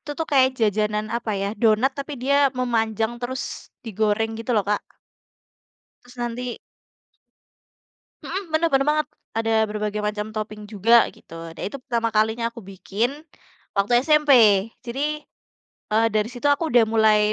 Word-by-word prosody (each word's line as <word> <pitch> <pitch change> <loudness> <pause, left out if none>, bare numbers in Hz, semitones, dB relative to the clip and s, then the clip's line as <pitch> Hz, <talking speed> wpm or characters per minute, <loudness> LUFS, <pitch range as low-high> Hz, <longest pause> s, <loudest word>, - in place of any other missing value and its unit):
Itu, 295 - -9
tuh, 325 - 0
kayak 260 -1 +6
jajanan 210 0 +1
apa, 235 -2 -4
ya, 200 - -1
donat 230 +5 +4
tapi 280 +1 -5
dia 280 +2 +3 0.2
memanjang 225 -2 0
terus 255 +2 -3 0.4
digoreng, 220 0 0
gitu, 230 +2 -5
loh, 205 - +2
Kak. 210 -1 +1 1.2
Terus 245 +1 -17
nanti. 240 0 -4 1.7
Mhm, 380 -4 -5
benar 325 +1 +2
benar 270 0 +3
banget, 305 0 0 0.3
ada 225 0 0
berbagai 210 0 -3
macam 210 0 -2
topping 215 -1 -5
juga, 225 +3 +4
gitu. - - -20 0.2
Nah, - - -6
itu 210 - -4
pertama 235 -2 -1
kalinya 220 +2 +1
aku 235 - -10
bikin 195 +4 -2 0.6
waktu 200 +4 0
SMP. 300 0 +3 0.5
Jadi, 295 +5 -3 0.7
eee, 225 +1 +3
dari 215 +1 +1
situ 245 +2 -9
aku 320 +2 -2
udah 240 -1 +5
mulai 220 -1 +4
225 Hz, 145 wpm, -23 LUFS, 215-260 Hz, 1.7 s, kayak